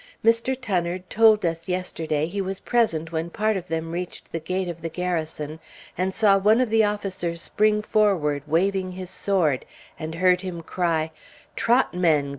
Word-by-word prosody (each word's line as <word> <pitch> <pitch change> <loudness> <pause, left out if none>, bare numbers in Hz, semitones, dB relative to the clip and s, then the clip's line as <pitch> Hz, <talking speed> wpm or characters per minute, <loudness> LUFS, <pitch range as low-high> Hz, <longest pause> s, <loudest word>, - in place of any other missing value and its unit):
Mr. 230 +3 +3
Tunnard 180 -6 -2
told 220 -2 +5
us 165 +1 -2
yesterday 160 -4 -1
he 195 +5 -3
was 190 0 -4
present 165 -10 +1
when 165 +1 -2
part 215 +4 0
of 180 -2 -4
them 165 0 -3
reached 175 +1 -6
the 165 - -2
gate 185 +3 -2
of 170 -1 -6
the 165 - -3
Garrison, 160 -3 -3 0.4
and 185 +2 0
saw 200 -1 +4
one 215 +4 +4
of 250 -4 +1
the 225 0 +5
officers 190 -5 -2
spring 210 +4 +1
forward, 185 -10 +2
waving 185 +3 +1
his 185 0 -7
sword, 170 -10 +1 0.4
and 160 +1 -5
heard 180 +1 +3
him 180 -3 -6
cry, 160 -2 -1 0.4
"Trot, 240 +3 +2
men! 160 -6 +2
180 Hz, 170 wpm, -24 LUFS, 165-205 Hz, 0.4 s, told